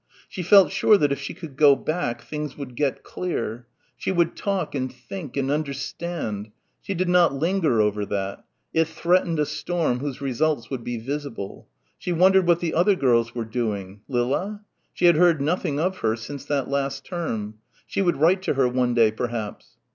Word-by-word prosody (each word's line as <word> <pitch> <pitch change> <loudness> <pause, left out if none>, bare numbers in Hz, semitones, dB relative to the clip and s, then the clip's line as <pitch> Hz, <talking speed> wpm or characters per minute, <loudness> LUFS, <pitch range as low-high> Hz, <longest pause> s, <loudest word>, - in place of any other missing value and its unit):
She 185 - -6
felt 185 -2 +6
sure 215 - +5
that 145 -6 +2
if 140 - -1
she 140 - -6
could 160 -6 -9
go 145 -1 +6
back, 155 -6 -2
things 150 -2 -5
would 135 -4 -7
get 140 0 -1
clear. 120 -9 -4 0.3
She - - -2
would 170 -2 +1
talk 195 -5 -2
and 130 -2 -2
think 140 +3 -8
and 135 0 0
understand.... 140 -6 -3 0.3
She 195 - -4
did 185 +1 0
not 175 -5 +4
linger 160 - +1
over 105 -1 +2
that. 100 -1 -3 0.3
It 160 0 +3
threatened 170 +1 +1
a 150 - +2
storm 150 -3 -1
whose 140 -1 -4
results 140 -1 -1
would 130 -3 -4
be 120 0 -3
visible. 130 -4 -5 0.3
She 180 - -3
wondered 185 +1 +5
what 170 -1 +4
the 165 -2 -1
other 185 +5 +4
girls 115 -6 +2
were 115 -2 -2
doing 105 -4 -3
Lilla? 140 +12 -1 0.3
She - - 0
had 170 -3 +6
heard 170 -2 +5
nothing 150 -1 0
of 185 +3 0
her 110 0 +1
since 140 +4 -8
that 140 -3 -1
last 140 0 -2
term. 110 - -4 0.3
She - - -2
would 175 -3 +2
write 175 +6 +4
to 190 - -1
her 135 -2 +3
one 125 -1 +1
day, 115 -2 +5
perhaps. 115 -2 -5
140 Hz, 185 wpm, -24 LUFS, 120-170 Hz, 0.3 s, felt